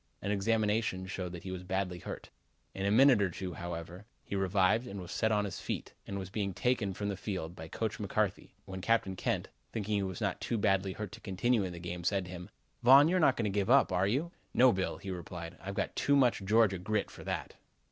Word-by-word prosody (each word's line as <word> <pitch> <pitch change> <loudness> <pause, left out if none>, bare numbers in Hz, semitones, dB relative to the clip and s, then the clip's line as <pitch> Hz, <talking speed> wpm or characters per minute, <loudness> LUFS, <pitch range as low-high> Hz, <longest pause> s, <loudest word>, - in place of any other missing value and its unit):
An 100 - -2
examination 105 -1 +1
showed 95 -1 -4
that 85 - -8
he 95 - -5
was 95 -1 -5
badly 95 -1 -2
hurt. - - -8 0.4
In 95 +1 -2
a - - +2
minute 125 0 +6
or 95 - +2
two, 90 +1 -5
however, 85 +3 -6 0.2
he - - -5
revived 95 +4 +2
and 100 -4 -6
was 90 0 -8
set 110 +1 +1
on 105 -1 +2
his 95 - -5
feet - - -4
and 100 - -4
was 95 -1 -6
being 100 -3 -2
taken 110 -6 0
from 100 - -3
the 100 - -2
field 90 -4 -4
by 80 -2 -8
Coach - - -3
McCarthy, - - -1
when 95 -1 -6
Captain 110 -3 +1
Kent, - - -1 0.2
thinking 105 -1 -2
that 100 -1 +1
he - - -2
was 95 - -6
not 100 -4 -1
too 120 - -1
badly 95 -2 +2
hurt 105 -1 -6
to 115 +2 -11
continue 105 +3 +1
in 95 - -3
the - - -8
game, 85 0 -5
said 95 +1 +1
to 90 - -9
him: 90 -1 -8 0.3
"Von, 135 +5 +8
you 185 - +2
are - - +3
not 140 -6 +4
going 115 - 0
to 105 - 0
give 100 +1 0
up, 135 -5 +5
are 95 +1 +2
you?" 140 +11 0 0.2
"No, 130 0 +7
Bill," 95 -3 -1
he 95 - -6
replied, 85 -1 -6
"I've 100 +1 -5
got - - -2
too 145 - +3
much 125 -7 +3
Georgia 105 -2 +4
grit 105 +3 -1
for - - -11
that." - - -4
100 Hz, 245 wpm, -32 LUFS, 95-110 Hz, 0.4 s, Von